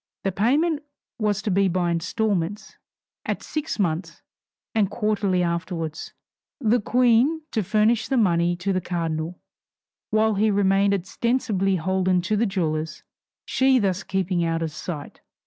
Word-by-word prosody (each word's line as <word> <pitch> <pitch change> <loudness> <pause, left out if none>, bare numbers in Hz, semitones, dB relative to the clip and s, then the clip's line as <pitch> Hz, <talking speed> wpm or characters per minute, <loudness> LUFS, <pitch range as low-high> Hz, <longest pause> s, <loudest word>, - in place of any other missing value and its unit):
The 195 - 0
payment 290 - +1 0.4
was 210 -1 0
to 210 - -1
be 195 +1 +3
by 175 -1 0
instalments, 200 +2 -1 0.5
at - - -3
six 305 0 -3
months, 170 -3 -2 0.5
and 210 -4 +2
quarterly 205 -5 0
afterwards; 170 -2 -3 0.5
the 235 -2 +2
Queen 250 +7 +3
to 220 - 0
furnish 215 +4 +2
the 270 - 0
money 175 -5 +3
to 190 +3 -2
the 185 - 0
cardinal, 165 -1 -3 0.7
while 220 0 +2
he 210 +2 +2
remained 200 0 +3
ostensibly 200 0 0
holden 185 +1 +1
to 210 +4 0
the 225 +2 +2
jewellers, 160 -5 -2 0.4
she 265 0 +3
thus 195 -4 +1
keeping 185 -3 -1
out 165 0 0
of 160 - -3
sight. 155 -1 -7
195 Hz, 140 wpm, -24 LUFS, 175-220 Hz, 0.7 s, be